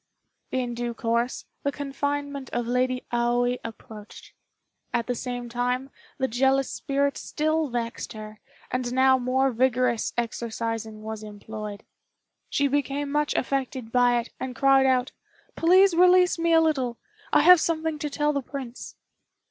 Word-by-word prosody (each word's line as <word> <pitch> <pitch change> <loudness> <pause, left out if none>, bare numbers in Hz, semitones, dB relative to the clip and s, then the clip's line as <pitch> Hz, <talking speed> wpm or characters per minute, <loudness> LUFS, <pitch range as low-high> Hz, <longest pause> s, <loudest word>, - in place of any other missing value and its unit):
In 250 -2 -1
due 240 0 -3
course, 235 +2 -1 0.2
the 280 - 0
confinement 285 -1 -3
of 240 - -1
Lady 250 +1 0
Aoi 245 +1 +1
approached. 215 -2 -10 0.6
At 235 - 0
the 250 - -1
same 245 0 -5
time, 250 +3 -2 0.3
the 265 - 0
jealous 265 +2 +2
spirit 280 0 -1
still 310 +1 0
vexed 235 -1 -4
her, 215 -1 -9 0.3
and 250 -1 -2
now 260 0 +5
more 260 +2 +1
vigorous 250 -1 +1
exorcising 225 -2 -3
was 220 0 -5
employed. 210 0 -8 0.7
She 280 - +2
became 280 +1 -1
much 295 0 0
affected 260 -3 -2
by 245 -1 +4
it, 235 - -7
and 260 -1 -5
cried 270 +1 +4
out, 255 -1 +2 0.4
"Please 370 +2 +5
release 360 0 +5
me 335 0 +1
a 325 0 +6
little; 265 -7 0 0.3
I - - +5
have 360 -2 +8
something 320 -2 -1
to 295 - -3
tell 295 +1 0
the 280 - -1
Prince." 260 -2 -8
255 Hz, 145 wpm, -26 LUFS, 235-280 Hz, 0.7 s, have